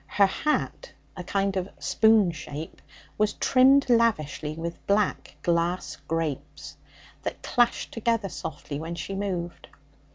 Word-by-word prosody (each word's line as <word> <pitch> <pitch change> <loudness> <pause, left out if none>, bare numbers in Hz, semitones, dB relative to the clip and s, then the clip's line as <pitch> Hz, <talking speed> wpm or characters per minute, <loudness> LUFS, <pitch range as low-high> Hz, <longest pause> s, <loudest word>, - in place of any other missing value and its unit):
Her 200 - +4
hat, 300 - -1 0.2
a 180 - -6
kind 195 +1 0
of 185 0 -2
spoon 220 -5 +4
shape, 155 -1 -8 0.4
was 210 0 +2
trimmed 270 +2 +5
lavishly 185 - +1
with 170 +1 -6
black 200 0 +1
glass 170 +1 0
grapes, 160 -3 -3 0.5
that - - -5
clashed 240 -1 +1
together 230 -2 0
softly 150 -5 -6
when 165 +2 -5
she 170 +4 -5
moved. 185 -3 -4
190 Hz, 125 wpm, -26 LUFS, 165-220 Hz, 0.5 s, trimmed